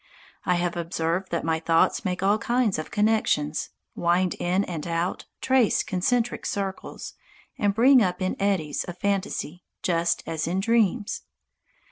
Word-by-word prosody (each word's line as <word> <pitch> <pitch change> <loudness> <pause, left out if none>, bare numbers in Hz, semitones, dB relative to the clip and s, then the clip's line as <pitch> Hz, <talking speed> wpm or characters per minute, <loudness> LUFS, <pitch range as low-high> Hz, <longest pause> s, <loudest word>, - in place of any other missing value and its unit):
I 180 - +3
have 175 0 -1
observed 170 +2 -2
that 170 - -2
my 160 0 0
thoughts 165 +4 +2
make 180 -2 -2
all 205 +2 +3
kinds 235 -7 +1
of 155 - -5
connections, 210 -8 +1 0.2
wind 175 +1 +1
in 185 +3 +1
and 170 -4 -5
out, 170 +2 -2
trace 260 -4 +3
concentric 235 +6 0
circles, 195 -1 -4 0.5
and 205 -1 +1
break 255 +3 +6
up 180 -3 0
in 185 -1 -1
eddies 185 -8 0
of 175 -1 -8
fantasy, 185 -4 -2 0.2
just 170 -1 +1
as 160 -1 -3
in 180 +3 0
dreams. 225 0 +1
185 Hz, 145 wpm, -25 LUFS, 170-205 Hz, 0.5 s, break